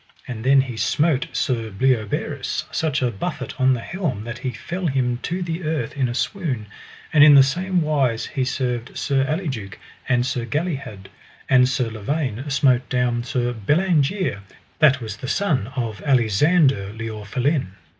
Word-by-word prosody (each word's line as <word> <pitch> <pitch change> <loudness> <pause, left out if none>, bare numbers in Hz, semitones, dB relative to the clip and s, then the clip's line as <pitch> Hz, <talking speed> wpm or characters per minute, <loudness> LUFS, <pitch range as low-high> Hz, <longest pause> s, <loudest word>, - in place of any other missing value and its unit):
And 115 -3 -6
then 135 +1 +5
he 125 -4 -6
smote 150 +2 +1
Sir 115 -4 -1
Bleoberis 110 0 -1
such 150 -4 0
a 125 - +1
buffet 130 +6 -4
on 130 0 +5
the 120 - -5
helm 155 - -3
that 120 +1 -6
he 130 - -3
fell 170 +9 -4
down 125 -4 0
to 180 +2 -2
the 170 +1 -4
earth 155 -1 -2
in 130 -3 0
a 120 - -4
swoon. 140 - -2 0.5
And 150 -2 +7
in 150 -1 +9
the 135 - +9
same 180 +5 0
wise 135 -7 +1
he 135 -3 -2
served 125 -2 -2
Sir 135 -2 +1
Aliduke 135 - -3 0.3
and 120 0 +2
Sir 125 -2 -2
Galihud. 140 - -3 0.4
And 125 -1 +5
Sir 130 -4 -1
Lavaine 130 +3 -3
smote 130 -3 +2
down 125 -1 0
Sir 120 -1 -1
Bellangere, 155 - +1 0.4
that 140 -4 +5
was 110 -2 -6
the 130 - -7
son 145 - 0
of 115 -4 -3
Alisander 130 - +2
le 115 0 -4
Orphelin. 125 - -1
130 Hz, 165 wpm, -22 LUFS, 120-150 Hz, 0.5 s, in